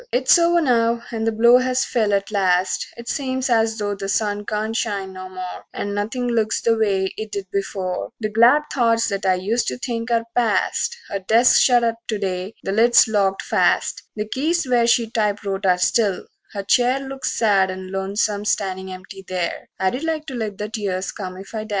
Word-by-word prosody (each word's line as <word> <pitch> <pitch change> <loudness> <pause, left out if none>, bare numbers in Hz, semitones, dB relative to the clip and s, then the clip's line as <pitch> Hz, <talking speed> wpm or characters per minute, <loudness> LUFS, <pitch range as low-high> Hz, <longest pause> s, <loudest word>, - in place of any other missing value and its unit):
XXVII - - +4
It's 260 +6 +5
over 340 0 +3
now; 235 -4 +2
the 225 -1 -1
blow 235 +3 +5
has 255 0 0
fell 220 -4 0
at 200 +1 0
last; 185 -2 +1
It 235 0 -10
seems 260 -2 -2
as 225 -1 +2
though 205 -1 -2
the 195 -1 -5
sun 205 0 -1
can't 215 +1 -2
shine 200 -4 -2
no 185 0 -8
more, 185 -1 -7
And 205 - -3
nothing 220 +5 -2
looks 225 -2 0
the 230 -1 +2
way 195 -3 0
it 220 -1 -6
did 195 -2 -5
before; 190 -1 -3
The 215 -2 -2
glad 235 +7 +5
thoughts 230 -3 +2
that 195 -1 -2
I 185 - +4
used 210 +6 -1
to - - -2
think 235 -2 -4
are 230 -1 +1
past. 245 - +1
Her 200 - -3
desk's 225 +6 +4
shut 245 -2 +4
up 230 -1 0
to 215 - -1
day, 190 0 -4
the 195 - -2
lid's 230 +3 +5
locked 200 -3 0
fast; - - +1
The 210 -1 -3
keys 310 +6 -1
where 240 -2 +3
she 235 -1 +3
typewrote 205 -3 -1
are 180 -1 +4
still; 200 +1 +1 0.3
her 200 -2 -4
chair 245 +6 +3
Looks 270 0 -4
sad 200 -4 +2
and 185 0 -7
lonesome 200 +2 -1
standin' 190 -2 -2
empty 190 +1 -10
there 180 -2 -3
I'd 190 +10 -1
like 320 -1 -2
to 270 - -7
let 220 -5 -4
the 210 - -4
tears 195 -4 -3
come 185 -2 -7
if 195 +3 -11
I 215 -1 -4
dast. - - -14
215 Hz, 205 wpm, -21 LUFS, 195-235 Hz, 0.3 s, It's